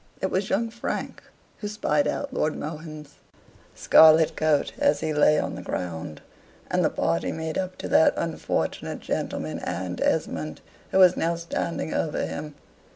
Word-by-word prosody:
It 190 - -2
was 190 +1 -1
young 225 +4 0
Frank 235 - -4 0.4
who 210 - -4
spied 150 -8 0
out 285 -2 -3
Lord 155 - 0
Mohun's 155 -1 -8 0.6
scarlet 160 0 +6
coat 155 -2 +1
as 285 0 +2
he 155 -1 -1
lay 150 0 +4
on - - -2
the - - -6
ground, 80 -3 -5 0.5
and - - +2
the - - +3
party 85 0 -1
made 160 0 -4
up 185 -1 -4
to - - -5
that 160 - +5
unfortunate 165 -1 -2
gentleman - - -3
and 90 0 -4
Esmond, 75 -1 -1 0.3
who - - 0
was 185 -2 +7
now 170 +1 0
standing 170 -1 -3
over 155 - -1
him. 150 0 -6
160 Hz, 160 wpm, -25 LUFS, 150-185 Hz, 0.6 s, was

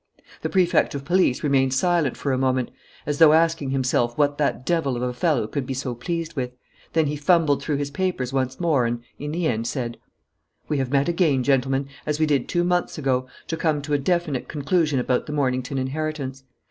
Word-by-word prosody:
The - - -2
Prefect 180 -6 +2
of 140 -1 -5
Police 175 -6 +2
remained 135 -2 +2
silent 165 -2 +1
for 140 - -1
a - - +1
moment, 130 -1 0 0.3
as 145 0 -2
though 160 -2 +8
asking 160 -3 +2
himself 130 -3 0
what 145 -1 +2
that 140 -3 0
devil 160 -6 +1
of 120 - -3
a 125 0 -1
fellow 135 -2 +1
could 130 +4 -4
be 135 - -3
so 130 -1 -3
pleased 165 +7 -4
with; 125 -4 -3 0.4
then 160 -1 +3
he 150 +1 -1
fumbled 150 -1 +3
through 150 - -1
his 140 0 -2
papers 140 -6 -2
once 130 -1 -1
more 150 -8 +2
and, 120 0 -3 0.2
in 145 +1 -4
the 170 +2 -1
end, 115 -5 0
said: 120 -4 -3 0.7
"We 150 - 0
have 135 -2 -1
met 140 +1 +2
again, 165 -7 +2
gentlemen, 135 0 +1 0.2
as 150 0 -1
we 155 - +4
did 145 -4 +1
two 175 -1 +1
months 175 0 0
ago, 130 -3 0 0.2
to 165 - -2
come 155 -2 0
to 150 +1 -3
a 145 - +3
definite 160 -3 -1
conclusion 155 0 0
about 125 0 0
the 150 - -4
Mornington 130 -2 -1
inheritance. 135 -1 -3
140 Hz, 210 wpm, -23 LUFS, 130-160 Hz, 0.7 s, though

